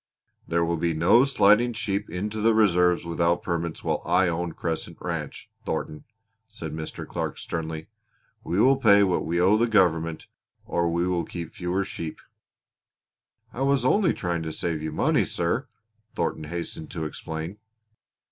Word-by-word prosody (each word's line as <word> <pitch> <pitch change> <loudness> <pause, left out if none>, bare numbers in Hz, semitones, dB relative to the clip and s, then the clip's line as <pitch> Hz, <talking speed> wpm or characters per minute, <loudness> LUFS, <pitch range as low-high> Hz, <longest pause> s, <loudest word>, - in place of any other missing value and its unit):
"There 85 0 +1
will 85 0 0
be 85 0 0
no 90 +11 +5
sliding 120 -2 +4
sheep 105 -3 -2
into 105 +5 -3
the 115 +1 +4
reserves 90 -5 +3
without 85 +1 +1
permits 85 -2 -3
while - - 0
I 95 -2 +3
own 85 0 -2
Crescent 80 -2 -4
Ranch, - - -5
Thornton," 75 - -4 0.4
said 85 -8 -7
Mr. 80 0 -6
Clark - - -3
sternly. 80 -1 -4 0.6
"We 90 - -1
will 135 +4 +5
pay 100 -5 +6
what 90 -4 0
we 85 +1 0
owe 95 +4 +5
the 120 +2 +2
government 85 -7 +2 0.4
or 85 -1 0
we 85 +1 0
will 90 -2 0
keep 85 -2 -7
fewer 90 +2 -1
sheep." 80 -4 -6 1.3
"I 125 - -5
was 135 -2 +2
only 190 +6 +4
trying 85 -2 -2
to 80 -1 -4
save 80 0 -2
you 80 0 -3
money, 75 - +2
sir," 85 +10 -1 0.5
Thornton 80 - -2
hastened 85 -1 -6
to 80 -2 -4
explain. 80 +5 -6
85 Hz, 155 wpm, -26 LUFS, 80-105 Hz, 1.3 s, pay